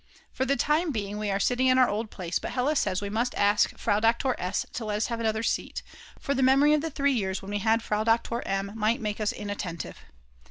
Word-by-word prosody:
For 260 - -1
the 275 +1 +2
time 300 +6 +1
being 210 -3 -3
we 210 -1 -2
are 195 0 0
sitting 250 +5 +2
in 255 0 +4
our 255 -1 +6
old 215 +1 -2
place, 175 -4 -3
but - - -5
Hella 265 +5 +1
says 190 -8 0
we 200 - -3
must 235 +3 -1
ask 205 +1 +2
Frau 205 -2 +1
Doktor 230 +3 +2
S. 180 +2 -1
to 225 - -4
let 210 -1 -1
us 215 - 0
have 230 - -3
another 220 -1 0
seat, - - -2 0.4
for 280 - -1
the 265 - 0
memory 275 +3 +5
of 300 - +2
the 325 - -2
three 280 -1 +1
years 195 -5 -2
when 195 - -7
we 205 - -1
had 225 +2 +2
Frau 210 -1 0
Doktor 230 +1 +1
M. 195 0 -2
might 225 +1 +1
make 210 -1 -3
us 210 - +1
inattentive. 195 -6 -5
225 Hz, 245 wpm, -27 LUFS, 205-255 Hz, 0.4 s, our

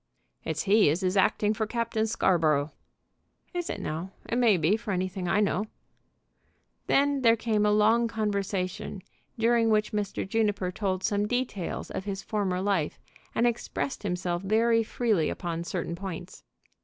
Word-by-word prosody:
"It's 160 -1 -2
he 205 -3 +5
as 165 +6 0
is 185 +1 +1
acting 210 +2 +3
for 220 0 -2
Captain 230 -1 -1
Scarborough." 155 -8 +2 0.8
"Is 350 -1 -3
it, - - -3
now? 165 +5 -4 0.2
It 235 - -1
may 230 -6 +5
be, 165 +5 +3
for 225 0 -7
anything 185 -1 -2
I 190 +4 +2
know." 205 +1 0 1.2
Then 280 0 +3
there 230 -2 +6
came 215 -2 +1
a - - +3
long 220 +3 +4
conversation, 200 -3 -2 0.3
during 230 0 +3
which 210 -1 +2
Mr. 205 -2 -2
Juniper 205 -3 0
told 190 -1 -2
some 205 0 +1
details 245 -7 -3
of 190 - -4
his 195 -1 -4
former 195 -4 -1
life, 190 -6 0 0.4
and 235 - +3
expressed 240 +3 -2
himself 180 -3 -2
very 225 +3 +3
freely 220 -6 0
upon 170 -2 -3
certain 170 -1 -3
points. 180 -1 -7
205 Hz, 155 wpm, -28 LUFS, 185-225 Hz, 1.2 s, there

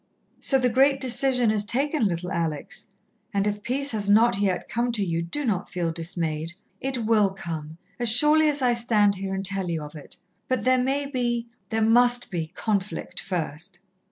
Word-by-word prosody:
"So 270 - +4
the 255 -1 +1
great 270 +3 +3
decision 250 -2 +2
is 210 -1 +1
taken, 270 +2 0
little 180 0 -4
Alex. 160 -4 -3 0.5
And 200 0 +1
if 210 0 -2
peace 275 +5 0
has 205 -3 -2
not 215 0 +4
yet 190 -3 -1
come 240 +1 -1
to 205 -3 +1
you, 165 -1 -2
do 225 +13 -3
not 200 -6 -2
feel 175 -2 -2
dismayed. 165 -1 -3 0.3
It 260 -4 -3
will 215 -3 +3
come, 160 -4 -6 0.2
as 240 -2 +6
surely 300 +6 +7
as 290 -2 -1
I 245 -1 +3
stand 220 -4 +2
here 195 0 -4
and 195 0 -4
tell 190 -1 -1
you 160 -2 -3
of 150 - -10
it. 150 -3 -11 0.3
But 255 -5 -1
there 255 +1 +3
may 275 +3 -1
be 240 -3 -2 0.2
there 225 -1 0
must 245 +2 +3
be 165 -3 -3
conflict 200 +3 -3
first." 175 0 -4
215 Hz, 185 wpm, -24 LUFS, 180-250 Hz, 0.5 s, surely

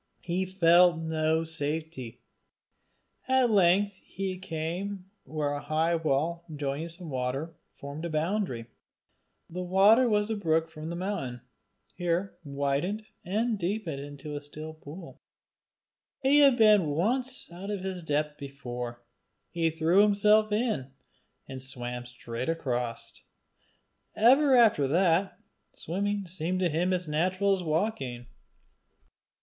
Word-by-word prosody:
He 180 +2 -1
felt 175 -2 +5
no 160 0 0
safety. 155 -5 -4 1.0
At 260 -2 +3
length 195 0 +4
he 190 -1 -5
came 185 +3 -4
where 150 -2 -2
a 145 - -4
high 160 +3 +1
wall 165 +1 0
joining 145 +3 -3
some 170 -1 -7
water 130 +5 -2 0.2
formed 140 +4 -8
a - - -3
boundary. 155 - -1 0.8
The 180 +2 -5
water 200 +7 +5
was 210 0 +1
a - - 0
brook 165 -4 0
from 155 0 -7
the 170 - -4
mountain, 170 - -3 0.5
here 175 +2 -1
widened 140 +9 -1 0.2
and 215 +4 0
deepened 175 -5 -2
into 145 +1 -8
a 145 - -4
still 155 +2 -8
pool. 160 +3 -11 1.0
He 280 +2 +5
had 275 -4 +6
been 210 -6 +6
once 245 - -1
out 185 +4 -7
of 205 -2 -3
his 190 -1 -4
depth 150 -1 -1
before: 125 -4 -6 0.5
he 165 -1 +1
threw 165 +4 +3
himself 210 +1 +4
in, 210 - 0 0.6
and 130 -1 -7
swam 125 -2 -5
straight 125 +1 -5
across: 125 -7 -3 0.9
ever 265 +5 +5
after 215 - +5
that, 175 +4 +2 0.4
swimming 200 +4 -2
seemed 180 +1 -3
to 180 - +2
him 170 +4 0
as 180 -2 -1
natural 185 +6 +1
as 190 - -1
walking. 155 - -2
170 Hz, 125 wpm, -28 LUFS, 150-195 Hz, 1.0 s, had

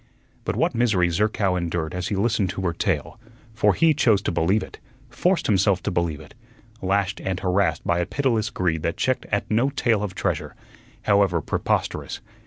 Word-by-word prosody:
But - - -1
what - - +1
misery 105 -7 +2
Zerkow 100 0 +1
endured 85 -2 -2
as 90 -1 -3
he 105 - -1
listened 105 -1 +1
to 95 - -4
her 85 -2 0
tale! - - -2 0.3
For 110 - +3
he 165 -1 +4
chose 115 -9 +3
to - - 0
believe 95 +6 +1
it, - - -11 0.3
forced 180 -2 +1
himself 95 -2 +2
to - - -1
believe 85 -4 -1
it, - - -14 0.5
lashed 100 +1 0
and 95 -1 -2
harassed 95 -2 0
by 85 0 +1
a 85 - -1
pitiless 115 -6 0
greed 85 -6 -1
that 85 +1 -2
checked 130 -1 0
at 100 +1 -1
no 120 +6 +3
tale 120 -6 +1
of 100 -3 -4
treasure, - - -2 0.5
however 100 -4 +3
preposterous. - - -2
100 Hz, 185 wpm, -24 LUFS, 90-110 Hz, 0.5 s, he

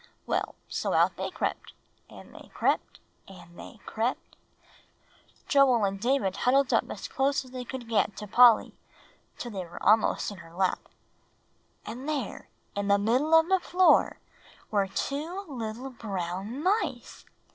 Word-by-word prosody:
Well, - - -2
so - - -2
out - - +3
they - - -4
crept - - -4 0.4
and - - -14
they - - -13
crept - - 0 0.3
and 175 -3 -14
they - - -11
crept" 230 +3 -3 1.1
Joel 260 -6 +4
and 195 0 -2
David 230 -5 0
huddled 270 +1 +2
up - - +2
as - - -6
close 275 0 0
as 255 - -15
they 255 -1 -5
could 245 -1 -7
get 220 -3 0
to 210 - -6
Polly, 235 +2 +5 0.6
till 240 - -6
they 195 -3 -4
were 170 0 -11
almost 215 +1 +3
in 205 - -9
her 165 +1 -14
lap 185 0 +1 1.1
"And 250 +7 -6
there, 280 -8 -4 0.3
in 200 0 -2
the 200 0 +4
middle 250 +10 +2
of 325 - 0
the 380 0 +3
floor, 365 +1 +3 0.5
were 200 -2 +2
two 310 - -4
little 245 -1 -6
brown 200 - -5
mice!" 405 +5 -1
235 Hz, 150 wpm, -28 LUFS, 200-275 Hz, 1.1 s, Polly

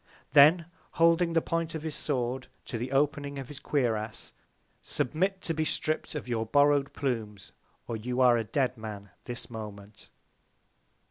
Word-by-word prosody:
Then 155 +4 +7 0.3
holding 165 +1 +4
the 165 - +2
Point 165 -1 -2
of 155 - -5
his 160 -1 -3
Sword 130 -3 -2 0.2
to 115 - -4
the 125 +3 -4
opening 140 0 0
of 135 -2 -6
his 145 -1 -8
Cuirass, 115 -8 -2 0.5
Submit 190 +8 -1
to 165 - +1
be 160 0 0
stripp'd 155 0 -2
of 150 - -5
your 115 -2 -1
borrow'd 145 +2 +4
Plumes, 110 -7 -3 0.4
or 115 - -3
you 125 +3 -3
are 125 -2 +6
a 115 - +1
dead 125 +1 -1
Man 105 -3 -7
this 120 -1 -6
Moment. 105 -2 -9
135 Hz, 155 wpm, -29 LUFS, 115-155 Hz, 0.5 s, Then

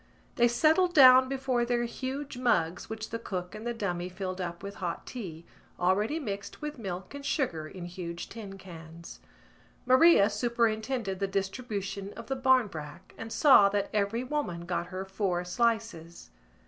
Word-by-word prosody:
They 240 - +4
settled 320 +9 +3
down 260 -2 +8
before 265 -3 0
their 240 0 0
huge 265 +4 -5
mugs 185 -9 0
which 220 -1 -6
the 230 - -3
cook 180 -5 -5
and 220 +2 -7
the 240 - -1
dummy 180 -5 -3
filled 185 0 -5
up 170 0 -5
with 200 0 -7
hot 170 -2 -3
tea, 170 -9 -7 0.3
already 205 - +1
mixed 200 -8 -6
with 300 -3 -6
milk 190 -1 -6
and 285 0 -8
sugar 170 - -1
in 180 +1 -8
huge 175 -1 -6
tin 200 -4 -9
cans. 170 -3 -11 0.7
Maria 255 -3 +6
superintended 220 -1 -1
the 195 - 0
distribution 200 0 -4
of - - -9
the 270 - -2
barmbrack 200 - 0
and 225 0 -8
saw 260 -10 +6
that 200 0 -1
every 210 +3 0
woman 255 - -3
got 175 0 -2
her 185 +1 -5
four 190 -2 -2
slices. 215 - -2
205 Hz, 160 wpm, -29 LUFS, 180-250 Hz, 0.7 s, down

